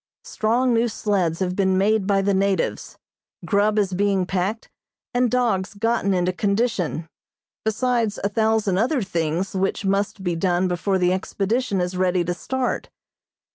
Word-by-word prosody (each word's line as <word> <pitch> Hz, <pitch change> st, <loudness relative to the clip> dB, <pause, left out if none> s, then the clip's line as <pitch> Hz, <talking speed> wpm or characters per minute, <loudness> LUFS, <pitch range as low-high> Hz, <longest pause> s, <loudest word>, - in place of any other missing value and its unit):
Strong 240 Hz, +3 st, +1 dB
new 230 Hz, +1 st, +2 dB
sleds 195 Hz, -6 st, -1 dB
have 180 Hz, -1 st, -1 dB
been 190 Hz, -1 st, +2 dB
made 205 Hz, 0 st, +2 dB
by 195 Hz, -1 st, +2 dB
the 200 Hz, 0 st, +2 dB
natives, 195 Hz, -2 st, -1 dB, 0.5 s
grub 210 Hz, +1 st, +2 dB
is 195 Hz, -3 st, +1 dB
being 195 Hz, 0 st, +1 dB
packed 195 Hz, +4 st, -2 dB, 0.5 s
and 245 Hz, 0 st, +2 dB
dogs 220 Hz, -6 st, 0 dB
gotten 225 Hz, -1 st, 0 dB
into 180 Hz, -1 st, +1 dB
condition, 200 Hz, -5 st, -1 dB, 0.6 s
besides 225 Hz, -1 st, 0 dB
a 200 Hz, -, +1 dB
thousand 220 Hz, -3 st, +1 dB
other 250 Hz, +2 st, +1 dB
things 170 Hz, 0 st, -2 dB
which 195 Hz, +1 st, -1 dB
must 195 Hz, 0 st, 0 dB
be 175 Hz, -2 st, -1 dB
done 180 Hz, +1 st, +1 dB
before 185 Hz, +2 st, 0 dB
the 180 Hz, 0 st, +2 dB
expedition 200 Hz, +3 st, -1 dB
is 180 Hz, +1 st, -2 dB
ready 180 Hz, -1 st, +1 dB
to 175 Hz, +1 st, -2 dB
start. 255 Hz, +7 st, -3 dB
195 Hz, 150 wpm, -23 LUFS, 185-220 Hz, 0.6 s, new